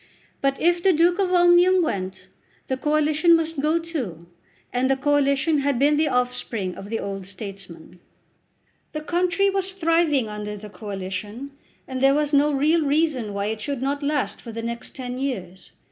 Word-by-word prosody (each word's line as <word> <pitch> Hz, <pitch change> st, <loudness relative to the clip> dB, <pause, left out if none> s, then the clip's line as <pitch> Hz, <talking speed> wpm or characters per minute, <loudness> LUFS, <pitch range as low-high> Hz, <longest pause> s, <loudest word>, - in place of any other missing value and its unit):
But 275 Hz, 0 st, +1 dB
if 345 Hz, +1 st, +2 dB
the 380 Hz, +1 st, +4 dB
Duke 345 Hz, +3 st, +3 dB
of 380 Hz, -2 st, +1 dB
Omnium 355 Hz, +1 st, +5 dB
went 190 Hz, -, -4 dB, 0.4 s
the 260 Hz, -, -1 dB
Coalition 305 Hz, +4 st, +3 dB
must 325 Hz, -2 st, -1 dB
go 310 Hz, +3 st, +2 dB
too, 260 Hz, -, -5 dB, 0.5 s
and 255 Hz, +1 st, +1 dB
the 270 Hz, -, +2 dB
Coalition 290 Hz, +2 st, +2 dB
had 280 Hz, -2 st, 0 dB
been 290 Hz, +4 st, +4 dB
the 305 Hz, +1 st, +2 dB
offspring 250 Hz, -7 st, -1 dB
of 195 Hz, -, -9 dB
the 225 Hz, 0 st, -2 dB
old 195 Hz, -1 st, -5 dB
statesman. 190 Hz, -4 st, -9 dB, 0.9 s
The 305 Hz, -, -3 dB
country 360 Hz, +4 st, +1 dB
was 385 Hz, 0 st, -2 dB
thriving 330 Hz, -, +2 dB
under 210 Hz, 0 st, -5 dB
the 210 Hz, 0 st, -10 dB
Coalition, 205 Hz, +5 st, -6 dB, 0.4 s
and 260 Hz, -1 st, -4 dB
there 270 Hz, +1 st, +5 dB
was 295 Hz, 0 st, 0 dB
no 290 Hz, +1 st, +4 dB
real 305 Hz, +4 st, +2 dB
reason 285 Hz, -6 st, +1 dB
why 200 Hz, 0 st, -2 dB
it 220 Hz, -1 st, -6 dB
should 275 Hz, 0 st, -3 dB
not 285 Hz, +2 st, -1 dB
last 285 Hz, -1 st, -1 dB
for 235 Hz, -, -8 dB
the 230 Hz, 0 st, -6 dB
next 235 Hz, 0 st, -6 dB
ten 250 Hz, -1 st, -5 dB
years. 190 Hz, -10 st, -5 dB
275 Hz, 175 wpm, -23 LUFS, 215-320 Hz, 0.9 s, Omnium